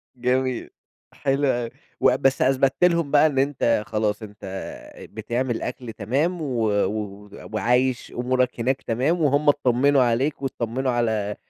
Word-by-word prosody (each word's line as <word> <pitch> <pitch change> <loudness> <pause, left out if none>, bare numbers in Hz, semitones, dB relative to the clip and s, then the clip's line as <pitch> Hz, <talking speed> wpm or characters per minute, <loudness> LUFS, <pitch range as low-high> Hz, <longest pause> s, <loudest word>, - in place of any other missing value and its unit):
جميل، 125 0 -1 0.4
حلو 140 +1 0
أوي، 120 -3 0 0.3
وأ - - +4
بس 135 0 +1
أثبت 135 0 +3
لهم 170 -4 +3
بقى 150 +1 +6
إن 135 -3 -1
أنت 130 -6 +1
خلاص، 105 -1 -1
أنت 105 0 -11 0.7
بتعمل 120 +3 -2
أكل 120 -2 -5
تمام، 140 - -1
و 125 -7 -1 0.2
و 105 0 -5 0.2
وعايش 125 +3 +1
أمورك 125 0 0
هناك 130 +3 0
تمام، 135 +9 0
وهم 145 0 +3
اتطّمنوا 140 0 +3
عليك 130 +6 0
واتطّمنوا 130 0 -2
على 110 -4 -1
125 Hz, 135 wpm, -23 LUFS, 115-135 Hz, 0.7 s, بقى